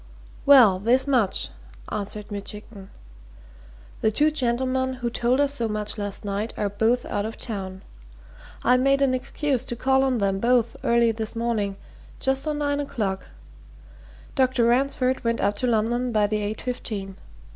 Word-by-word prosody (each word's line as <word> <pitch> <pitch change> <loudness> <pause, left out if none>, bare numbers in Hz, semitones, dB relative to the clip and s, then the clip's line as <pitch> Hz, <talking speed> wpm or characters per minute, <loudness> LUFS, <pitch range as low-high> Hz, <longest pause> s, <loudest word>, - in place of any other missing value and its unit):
"Well, 240 -10 +7
this 240 +6 +3
much," 250 -9 +1 0.4
answered 210 +1 -5
Mitchington. 205 0 -8 1.1
"The 220 - +3
two 300 +7 +3
gentlemen 260 -1 0
who 245 -2 -3
told 245 +3 +1
us 285 -1 +2
so 235 -5 -1
much 210 -1 -2
last 205 0 -5
night 205 +3 -3
are 205 - 0
both 225 +5 +1
out 205 - -2
of 220 +1 -5
town. 190 -4 -6 0.8
I 250 +1 +5
made 275 +2 +3
an 265 -2 +2
excuse 255 0 -1
to 240 - -4
call 265 +2 +2
on 260 -2 +1
them 195 -2 0
both 235 0 +2
early 235 -1 +3
this 220 0 -4
morning 225 -4 -1 0.4
just 265 +2 0
on 300 -1 -1
nine 285 -1 0
o'clock. 205 -9 -3 1.1
Dr. 255 -3 +2
Ransford 260 +1 +1
went 230 0 0
up 200 +1 +1
to 250 - 0
London 240 +2 +1
by 215 -2 +3
the 210 +1 -1
eight 210 +1 -3
fifteen. 205 -6 -5
235 Hz, 155 wpm, -24 LUFS, 210-260 Hz, 1.1 s, Well